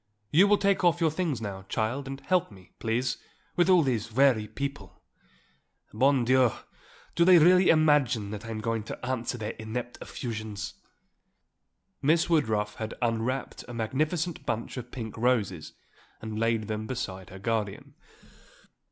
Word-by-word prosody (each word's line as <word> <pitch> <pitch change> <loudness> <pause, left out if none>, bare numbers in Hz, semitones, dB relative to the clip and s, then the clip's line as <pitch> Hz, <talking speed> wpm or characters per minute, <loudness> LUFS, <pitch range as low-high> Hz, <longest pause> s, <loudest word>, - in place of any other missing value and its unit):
You 180 +7 +6
will 205 0 +5
take 200 -1 +1
off 175 -1 +4
your 165 -2 +2
things 155 -7 -2
now, 100 -3 -5
child, 120 +5 -1
and 135 0 -6
help 180 -1 +1
me, 95 -2 -16
please, 120 +3 -1 0.4
with 175 +1 +3
all 180 -3 +6
these 115 -5 -1
weary 120 -3 +3
people. 140 - -6 0.9
Bon 130 +2 +3
Dieu! 130 -2 +4 0.6
do 170 - +3
they 180 0 +8
really 180 +3 +6
imagine 145 -10 +3
that 105 -1 -6
I 115 - -8
am 110 -1 -4
going 115 0 -1
to 125 - -7
answer 125 -1 -2
their 110 -2 -4
inept 120 +3 -5
effusions?" 110 -4 -5 1.3
Miss 165 +4 +2
Woodruff 110 -9 +1
had 110 0 -5
unwrapped 120 +2 -2
a 120 - -7
magnificent 155 +9 -1
bunch 115 +1 -3
of 125 -2 -6
pink 110 -4 -6
roses 110 -9 0 0.5
and 110 -1 -5
laid 115 -1 +1
them 110 0 -3
beside 95 -7 -5
her 95 - -10
guardian. 105 -1 -3
120 Hz, 150 wpm, -28 LUFS, 110-150 Hz, 1.3 s, they